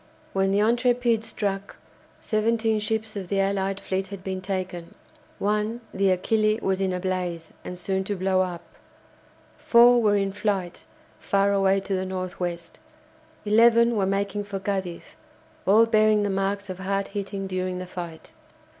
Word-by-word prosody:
When 195 0 +2
the 200 - +2
"Intrépide" 240 +1 +2
struck, 200 -3 -3 0.4
seventeen 220 0 +1
ships 220 0 -2
of 195 -3 -5
the 195 +2 0
allied 195 0 0
fleet 190 0 -2
had 195 -1 -9
been 190 -1 -4
taken, 185 -3 -4 0.4
one, 210 +3 -1
the 195 0 +2
"Achille," 215 +3 +2
was 190 0 0
in 190 -1 +1
a 180 - -2
blaze, 180 -3 -3
and 180 - -7
soon 190 +2 -1
to 205 - -2
blow 185 0 +1
up; 175 -2 -3 1.0
four 240 +1 +6
were 210 -2 +3
in 195 -1 0
flight 195 -3 -2 0.3
far 200 0 +2
away 195 0 +3
to 195 0 -4
the 185 0 -1
north 185 -1 -5
west, 175 -2 -5 0.7
eleven 235 +2 +5
were 195 -3 +1
making 200 +1 -1
for 200 -1 -5
Cadiz, 190 -3 -3 0.6
all 215 +4 +6
bearing 215 -2 +3
the 205 - 0
marks 195 +1 -1
of 185 -1 -6
hard 195 +1 -2
hitting 200 -1 -4
during 185 -1 -2
the 185 - -5
fight. 175 -3 -8
195 Hz, 160 wpm, -25 LUFS, 185-215 Hz, 1.0 s, four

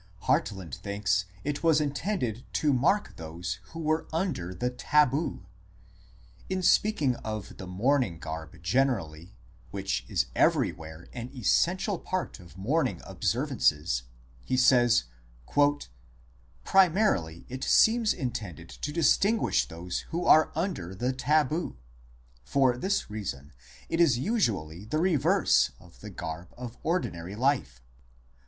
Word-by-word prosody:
Hartland 95 -8 0
thinks 100 -1 -1 0.2
it 145 0 -2
was 160 -2 +4
intended 145 - -2
to 150 -2 +2
mark 170 +11 +1
those 85 +3 -5
who 165 +11 -10
were 155 0 0
under 160 - -2
the 120 +8 -2
tabu; 145 - +1 1.0
in 185 -1 -1
speaking 175 - +3
of 110 -2 -6
the 95 - -8
mourning 110 - +1
garb 80 -1 -7
gener 125 +5 +2
ally, 80 -1 -10 0.4
which 95 -1 -2
is - - +1
everywhere 80 +1 0
an 120 0 -6
essential 180 - +1
part 185 -10 -3
of 85 -2 -15
mourning 125 - 0
observances, 75 -5 0 0.4
he 130 - -1
says: 120 - +5 0.8
" 65 +1 -20
Primarily 180 - +3
it 130 +1 -6
seems 225 -1 +4
intended 105 - -5
to 150 - -5
distinguish 165 - +2
those 85 +4 -5
who 170 +2 -2
are 155 - +6
under 160 - -3
the 125 +6 -1
tabu. 150 +5 +1 0.7
For 130 - +2
this 190 - -1
reason 80 -9 -6 0.3
it 165 +1 +1
is 145 -8 +4
usually 105 - -1
the 135 +8 -2
reverse 150 - +3
of 90 -1 -18
the 105 - -9
garb 85 -2 -6
of 120 -1 -8
ordinary 95 - -2
life 100 - 0
120 Hz, 125 wpm, -28 LUFS, -, 1.0 s, are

